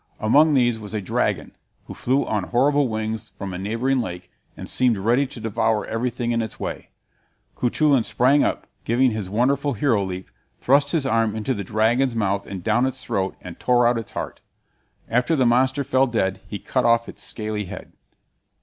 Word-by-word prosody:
Among 145 +8 +4
these 120 -3 +2
was 105 0 -6
a - - 0
dragon, 95 - -1 0.3
which - - -9
flew 130 +3 +1
on 105 -3 -1
horrible 140 +5 +2
wings 110 0 -4
from 100 -2 -5
a 90 - -5
neighboring 115 +7 0
lake, 90 -5 -5 0.3
and - - -7
seemed 125 -4 +2
ready 120 +8 +2
to 130 -2 -10
devour 110 0 0
everything 120 +1 -2
in 115 0 +1
its 110 -2 -6
way. - - -5 0.7
Cuchulain 135 +2 +2
sprang 135 +6 +3
up, - - -1 0.2
giving 125 +2 +2
his 105 -4 -4
wonderful 135 +6 +1
hero 115 -3 +1
leap, 95 -1 -6 0.3
thrust 140 +2 +3
his 150 -2 0
arm 115 -4 +1
into 110 +4 -1
the 100 -4 -4
dragon's 115 +5 +1
mouth 100 -2 -1
and 95 -3 -7
down 120 +6 +2
its 130 0 -5
throat, 95 -1 -2
and 90 -2 -10
tore 125 -1 +3
out 120 0 +3
its 110 - -8
heart. - - -5 0.7
After 125 +7 +1
the 130 -4 +2
monster 130 +4 +2
fell 130 0 +2
dead, 95 -6 -1
he - - -5
cut - - -1
off 115 0 +3
its - - -9
scaly 105 -2 -3
head. - - -9
115 Hz, 185 wpm, -23 LUFS, 105-130 Hz, 0.7 s, Among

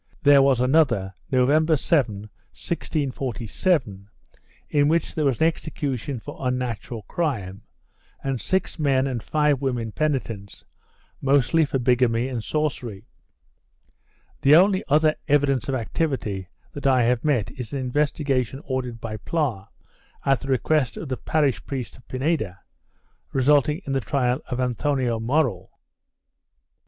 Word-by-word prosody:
There 145 -2 +7
was 135 -2 +3
another, 125 -8 +2 0.2
November 150 +5 +3
7, 130 - +1
1647, 125 - -3 0.6
in 145 -1 +3
which 165 +2 +1
there 155 - 0
was 135 -4 +1
an 160 - +4
execution 145 -5 -2
for - - -9
unnatural 125 -3 -3
crime 105 - -3 0.6
and 135 -3 -2
six 190 -2 -1
men 135 -3 +2
and 125 -4 -2
five 150 0 +1
women 120 -5 -2
penitents, 115 -9 -3 0.6
mostly 140 +4 +3
for 140 - -1
bigamy 125 -1 +2
and 120 -4 -4
sorcery. 125 -9 -3 1.4
The 140 +2 +7
only 190 +3 +5
other 155 +2 +4
evidence 140 -4 +2
of 135 - 0
activity 115 - -2 0.3
that 140 -1 -3
I 130 -2 +4
have 120 0 +1
met 125 -9 +1
is 125 -6 -7
an 140 - -3
investigation 135 -1 0
ordered 125 -3 -3
by 110 -1 -5
Pla, 120 - -2 0.6
at 135 -1 +3
the 135 - -7
request 135 -1 +1
of 155 - -6
the 130 - -2
parish 145 -6 0
priest 130 -7 -5
of 125 - -21
Pineda, 130 - -1 0.7
resulting 145 +5 +3
in 135 - -2
the 135 - +1
trial 125 +3 0
of 125 -1 -3
Anthoni 130 +2 0 0.2
Morell. 120 - 0
130 Hz, 130 wpm, -24 LUFS, 120-150 Hz, 1.4 s, There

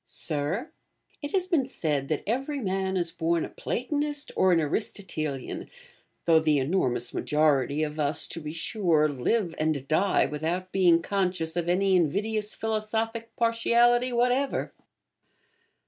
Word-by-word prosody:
Sir, 160 - -2 0.5
It 290 - -5
has 375 -2 +2
been 325 -8 +1
said 150 - -2
that 155 -1 -2
every 270 +6 -1
man 190 -3 -1
is 170 -2 -1
born 165 -1 0
a - - -8
Platonist 290 +3 -3
or 185 - +4
an 170 - +4
Aristotelian, 155 - -3 0.6
though 165 -1 +6
the 155 -2 +2
enormous 130 -5 0
majority 150 -1 +1
of 155 0 -4
us, 145 +1 +1
to 165 - -6
be 150 0 -5
sure, 165 -2 +1
live 165 - 0
and 155 -3 0
die 190 +6 +3
without 170 +5 -3
being 175 -3 +4
conscious 180 -5 -1
of 175 -1 -1
any 190 +2 +2
invidious 210 +6 0
philosophic 225 +1 -2
partiality 235 +2 +3
whatever. 250 +3 +1
180 Hz, 135 wpm, -27 LUFS, 155-225 Hz, 0.6 s, though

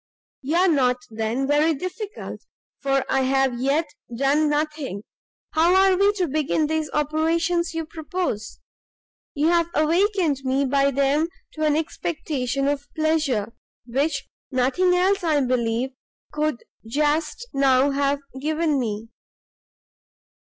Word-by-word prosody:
"You 290 +4 -2
are 365 +2 +4
not, 255 -7 +3
then, 225 +4 -1
very 300 +3 +3
difficult, 370 +7 -6 0.4
for 275 -1 +1
I 270 - +1
have 265 -2 +1
yet 290 +5 +1 0.2
done 275 +5 +2
nothing. 295 -8 -2 0.5
How 335 +3 +4
are 385 0 +5
we 400 +2 +4
to 370 -4 -1
begin 305 +1 0
these 315 0 -1
operations 325 +3 0
you 325 -1 -2
propose? 315 - -4 0.8
You 300 +3 +2
have 340 -1 +2
awakened 335 -1 +2
me 265 +1 +1
by 275 +1 +2
them 280 +3 +2 0.3
to 310 0 -1
an 300 -1 +3
expectation 295 -4 -2
of 285 0 -1
pleasure, 305 -9 0 0.3
which 275 +6 -1 0.2
nothing 280 +8 +2
else, 380 +2 +2
I 310 -3 +2
believe, 245 0 0 0.4
could 300 -4 -1 0.2
just 300 - 0
now 275 0 +3
have 280 0 0 0.2
given 310 0 0
me." 220 -2 -3
295 Hz, 125 wpm, -23 LUFS, 270-325 Hz, 0.8 s, are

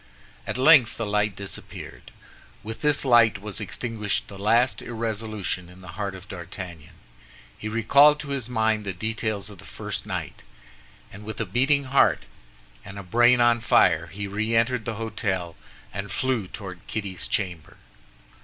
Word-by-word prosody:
At - - -2
length 130 -3 +6
the 115 - -2
light 105 0 0
disappeared. 100 -1 -7 0.5
With 110 +1 -7
this 150 -1 +2
light 120 -5 +5
was 105 +1 -4
extinguished 105 0 -2
the 100 - -9
last 115 +5 +3
irresolution 110 -5 -3
in 90 +1 -15
the 90 - -11
heart 100 -1 -4
of 95 +1 -11
D'Artagnan. 85 -2 -8 0.6
He 110 - -6
recalled 140 +7 +5
to 145 - -8
his 135 -4 -2
mind 110 -2 +1
the 100 -2 -3
details 110 +1 -3
of 100 - -13
the - - -12
first - - -6
night, - - -5 0.7
and 105 - -10
with 110 +1 -7
a 110 - 0
beating 135 +8 +2
heart 135 +1 +3 0.6
and 100 +1 -9
a 100 - -6
brain 120 +6 +4
on 120 -1 +4
fire 85 -7 +4
he 100 +4 -6
re 105 +3 -1
entered 115 0 +2
the 115 - -3
hôtel 100 -6 -2 0.4
and 100 +1 -5
flew 125 -6 0
toward 95 -2 -8
Kitty's 100 -4 -4
chamber. 90 -6 -3
110 Hz, 160 wpm, -25 LUFS, 100-120 Hz, 0.7 s, length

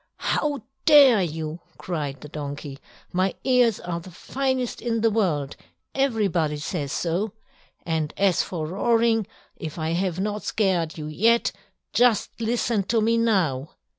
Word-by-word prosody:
"How 290 -6 -1 0.2
dare 280 -8 +8
you?" 160 -1 -3 0.2
cried 145 -6 -4
the - - -8
donkey. 145 -1 -6 0.3
"My 185 +1 +1
ears 250 -4 +3
are 170 -1 -4
the 170 - -11
finest 260 +6 -2
in 230 -2 -1
the 225 0 +3
world, 160 -10 0 0.4
everybody 200 - +1
says 145 -1 -3
so. 180 +7 -1 0.5
And 160 -3 -1
as 195 -3 +3
for 165 -4 -4
roaring, 225 +4 +2 0.3
if 160 -3 -6
I 160 0 -1
have 180 0 -1
not 210 +1 -2
scared 180 -7 0
you 155 - -5
yet, 225 +10 +2 0.4
just 245 -3 +3
listen 230 -1 +1
to 225 +3 +2
me 225 +1 +2
now!" 175 - +1
190 Hz, 140 wpm, -24 LUFS, 160-230 Hz, 0.5 s, dare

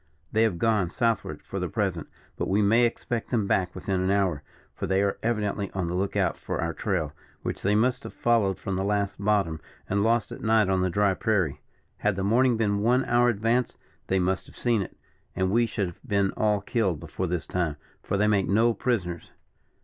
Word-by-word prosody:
They 110 - +2
have 110 -6 +2
gone 105 -4 +2
Southward 115 +4 -1
for - - -5
the - - -2
present; - - -2 0.3
but - - -2
we 100 +2 +2
may 115 +4 +5
expect 120 0 -4
them 115 -5 +1
back 90 -2 0
within 95 -2 -1
an 95 - 0
hour, 95 -7 +1 0.3
for - - -4
they 95 +1 +2
are 100 - -1
evidently 105 -3 -1
on 95 -2 -1
the 85 - -3
look 95 +2 -1
out - - +1
for - - -4
our - - -1
trail, - - -2 0.3
which - - -3
they 100 +2 +2
must 125 +3 +2
have - - -8
followed 110 -6 +1
from 95 -2 -3
the 95 - -1
last 100 0 -1
bottom, 100 -7 +1 0.3
and 100 +1 +1
lost 115 +1 +2
at - - -8
night 110 -2 +3
on 95 -1 +2
the 95 - +1
dry 100 +2 +2
prairie; 95 - 0 0.4
had 105 -1 0
the 95 - -2
morning 120 +4 +3
been 100 -2 +1
one 125 +5 +2
hour 120 0 +3
advanced, 115 +2 0 0.3
they 95 - +1
must 95 +1 0
have - - -16
seen 120 -4 +1
it, 95 - -7 0.4
and 95 0 +1
we 115 +2 +3
should 105 -2 -1
have 85 -1 -8
been 100 -6 +1
all 105 -2 +1
killed 100 - 0
before 85 +3 -4
this 85 -2 -2
time; 85 -5 -1 0.3
for 100 - -2
they 105 - +3
make 105 -2 +2
no 115 +4 +3
prisoners." 90 -10 -2
100 Hz, 215 wpm, -26 LUFS, 95-115 Hz, 0.4 s, may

